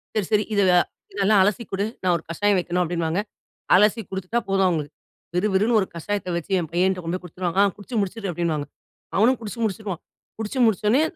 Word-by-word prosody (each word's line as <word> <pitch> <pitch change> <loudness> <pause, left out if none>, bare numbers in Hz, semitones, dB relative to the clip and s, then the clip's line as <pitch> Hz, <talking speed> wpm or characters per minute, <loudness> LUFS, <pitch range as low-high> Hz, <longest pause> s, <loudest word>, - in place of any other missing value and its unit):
சரி 210 -4 0
சரி 210 0 +4
"இததெல் 185 -3 +4 0.3
இதெல்லாம் 200 0 +4
அலசி 205 +4 +1
குடு. 195 +1 0 0.2
நான் 180 -1 +3
ஒரு 160 - -11
கஷாயம் 205 +4 +2
வைக்கணும்" 180 0 0
அப்டின்னுவாங்க. 170 +1 -1 0.5
அலசி 210 +4 +4
குடுத்துட்டா 190 +4 -2
போதும் 195 -1 +3
அவங்களுக்கு. 155 -4 -3 0.4
விறுவிறுன்னு 210 +4 +2
ஒரு 190 - -2
கஷாயத்த 195 +3 -3
வச்சு 170 - -7
என் 165 -3 -4
பையன்ட்ட 185 +1 +2
கொண்டு 165 +2 -2
போய் - - -28
குடுத்துருவாங்க. 180 +1 -3
"ஆ - - +5
குச்சு 210 +4 -8
முடிச்சுரு" 200 +1 -3
அப்டின்னுவாங்க. 160 -3 -2 0.5
அவனும் 235 +5 +4
குச்சு 220 +1 -6
முடிச்சுருவான். 200 -4 -3 0.4
குடிச்சு 220 +4 -3
முடிச்சொடனே, 220 +4 +3
195 Hz, 180 wpm, -23 LUFS, 175-210 Hz, 0.5 s, ஆ